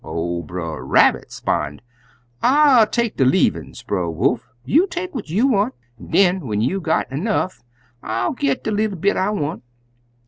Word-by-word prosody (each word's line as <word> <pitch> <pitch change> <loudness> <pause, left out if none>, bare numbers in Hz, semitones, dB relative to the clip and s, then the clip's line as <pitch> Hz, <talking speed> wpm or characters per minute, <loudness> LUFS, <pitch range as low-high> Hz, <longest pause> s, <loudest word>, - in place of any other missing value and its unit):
Ol' 85 +2 -3
Brer 80 0 -6
Rabbit - - +3
'spon', 75 0 -2 0.6
'I'll 265 -4 +5
take 235 0 -1
de - - +3
leavin's, 130 - +1
Brer 90 -4 -2
Wolf; 110 +9 -1 0.2
you 335 - +3
take 360 0 -5
what 230 - -6
you 205 +10 +2
want, 235 -1 +1 0.2
an' - - -12
den 185 -5 +2
when 105 -2 -1
you 125 - 0
done 160 -3 0
got - - -26
'nough 185 - -2 0.4
I'll 115 +2 -2
get 140 -1 -1
de 220 - -2
leetle 210 -2 -1
bit 200 +5 +1
I 190 - +1
want.' 165 -6 -3
175 Hz, 170 wpm, -20 LUFS, -, 0.6 s, I'll